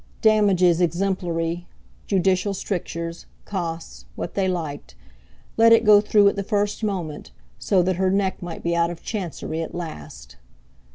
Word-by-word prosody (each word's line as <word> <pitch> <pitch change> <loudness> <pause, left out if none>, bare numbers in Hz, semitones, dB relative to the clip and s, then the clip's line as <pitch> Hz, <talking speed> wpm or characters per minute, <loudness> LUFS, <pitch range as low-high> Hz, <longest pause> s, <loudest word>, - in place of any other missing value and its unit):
Damages 195 -5 +4
exemplary, 175 -1 -1 0.4
judicial 190 +1 +1
strictures, 170 -3 -4 0.2
costs, 165 - -5
what - - -5
they 195 -1 0
liked—let 145 - -2
it 230 0 +6
go 210 -1 +7
through 210 -1 +4
at 200 - +2
the 200 - -2
first 205 +1 -1
moment, 175 -8 -3 0.3
so 190 -3 +2
that 185 0 0
her 190 0 +2
neck 195 0 0
might 175 -2 -7
be 170 0 0
out 170 0 +2
of 175 -1 -8
chancery 170 -5 -4
at 165 - -6
last! 70 - -8
180 Hz, 145 wpm, -23 LUFS, 165-200 Hz, 0.4 s, go